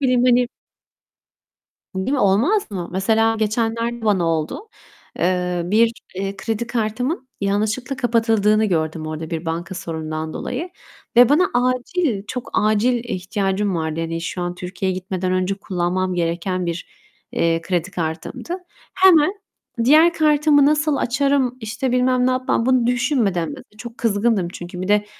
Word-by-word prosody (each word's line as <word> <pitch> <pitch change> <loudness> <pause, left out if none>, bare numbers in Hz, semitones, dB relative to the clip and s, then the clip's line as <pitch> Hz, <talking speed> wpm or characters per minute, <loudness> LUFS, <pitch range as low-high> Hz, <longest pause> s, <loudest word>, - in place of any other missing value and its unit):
bileyim, 250 -1 +3
hani 245 -1 +4 1.5
Değil 190 +7 -2
mi, 285 - +1
olmaz 235 - +2
mı? 180 -3 -4
Mesela 225 +4 +2
geçenlerde 230 +2 -1
bana 195 -5 +2
oldu. 165 - -2 0.5
Eee, 180 0 0
bir, 225 +5 +3 0.2
eee, 195 +1 -3
kredi 225 +3 -3
kartımın 245 - -2
yanlışlıkla 215 +7 -1
kapatıldığını 225 -3 +2
gördüm 160 -4 -1
orada 155 +1 -5
bir 165 0 -3
banka 170 +3 -3
sorunundan 160 -2 -4
dolayı 325 +9 -4 0.5
ve 245 0 +8
bana 320 +6 +4
acil, 255 - 0
çok 250 -1 -5
acil 225 +3 +2
ihtiyacım 195 -1 -1
vardı. 160 0 -2
Hani, 165 0 -3
şu 175 +1 -4
an 175 0 -3
Türkiye'ye 185 +1 -3
gitmeden 185 0 -3
önce 185 +1 0
kullanmam 185 -1 -2
gereken 175 +2 -1
bir, 170 +1 -4 0.5
eee, 165 0 +1
kredi 175 +1 -2
kartımdı. 165 - -4 0.4
Hemen 370 -2 +5 0.5
diğer 310 +6 +6
kartımı 300 -2 +4
nasıl 300 0 +2
açarım, 265 0 +1
işte, 240 +4 -3
bilmem 250 0 +2
ne - - +3
yapmam 255 -2 0
bunu 255 -2 +3
düşünmeden, 240 - +1
biraz 265 -3 -10
da - - -23
çok 235 +1 -9
kızgındım 210 -4 +1
çünkü 175 0 -8
bir 185 - -4
de 210 0 +3
215 Hz, 145 wpm, -21 LUFS, 180-250 Hz, 1.5 s, ve